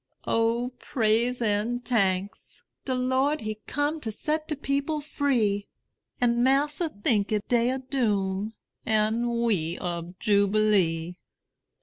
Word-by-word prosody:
O 230 Hz, +2 st, +1 dB
praise 240 Hz, -1 st, +1 dB
and 225 Hz, +3 st, 0 dB
tanks! 195 Hz, -4 st, -1 dB, 0.2 s
De 260 Hz, -, -1 dB
Lord 260 Hz, +4 st, +1 dB
he 215 Hz, -1 st, -4 dB
come 290 Hz, +3 st, -1 dB
To 220 Hz, -, -3 dB
set 310 Hz, +7 st, -2 dB
de 305 Hz, -, -2 dB
people 280 Hz, +2 st, -1 dB
free; 245 Hz, -9 st, 0 dB, 0.5 s
An' 240 Hz, -1 st, +2 dB
massa 295 Hz, +6 st, +2 dB
tink 205 Hz, -3 st, 0 dB
it 210 Hz, -1 st, -1 dB
day 240 Hz, 0 st, +3 dB
ob 260 Hz, 0 st, -5 dB
doom, 210 Hz, -4 st, 0 dB, 0.3 s
An' 230 Hz, +2 st, +1 dB
we 175 Hz, -7 st, 0 dB
ob 175 Hz, 0 st, -4 dB
jubilee. 200 Hz, -5 st, +2 dB
230 Hz, 120 wpm, -27 LUFS, 205-260 Hz, 0.5 s, day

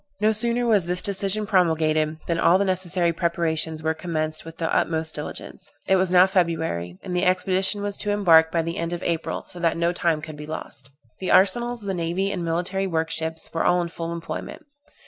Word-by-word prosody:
No 215 Hz, +1 st, +3 dB
sooner 235 Hz, +2 st, +1 dB
was 205 Hz, -7 st, +2 dB
this 180 Hz, 0 st, -1 dB
decision 200 Hz, +1 st, +1 dB
promulgated, 160 Hz, -5 st, +1 dB
than 170 Hz, -1 st, -1 dB
all 175 Hz, +2 st, +5 dB
the 200 Hz, -, +1 dB
necessary 180 Hz, -2 st, +1 dB
preparations 160 Hz, -2 st, -1 dB
were 160 Hz, 0 st, +1 dB
commenced 155 Hz, -2 st, -3 dB
with 165 Hz, 0 st, -11 dB
the 165 Hz, -1 st, -1 dB
utmost 160 Hz, -1 st, 0 dB
diligence. 150 Hz, -, -7 dB
It 190 Hz, -, +3 dB
was 185 Hz, -1 st, +1 dB
now 180 Hz, 0 st, +7 dB
February, 165 Hz, -, -1 dB
and 180 Hz, -, -4 dB
the 180 Hz, -, +1 dB
expedition 190 Hz, +2 st, +1 dB
was 205 Hz, -1 st, -2 dB
to 205 Hz, -, -3 dB
embark 165 Hz, -6 st, +5 dB
by 165 Hz, -1 st, +1 dB
the 165 Hz, +1 st, -4 dB
end 170 Hz, +1 st, -3 dB
of 175 Hz, -, -5 dB
April, 165 Hz, -1 st, -2 dB
so 180 Hz, -, -7 dB
that 165 Hz, -1 st, +1 dB
no 170 Hz, +1 st, +1 dB
time 170 Hz, -3 st, 0 dB
could 155 Hz, -2 st, -8 dB
be 150 Hz, 0 st, -8 dB
lost. 135 Hz, -3 st, -7 dB, 0.3 s
The 185 Hz, -, -3 dB
arsenals, 240 Hz, +5 st, +3 dB
the 200 Hz, -2 st, -3 dB
naval 180 Hz, +3 st, -1 dB
and 185 Hz, -3 st, -3 dB
military 180 Hz, +4 st, -1 dB
workships, 160 Hz, -1 st, -1 dB
were 165 Hz, -, 0 dB
all 180 Hz, -, +3 dB
in 170 Hz, -1 st, -2 dB
full 165 Hz, 0 st, -5 dB
employment. 170 Hz, -1 st, -6 dB
170 Hz, 205 wpm, -24 LUFS, 160-190 Hz, 0.3 s, now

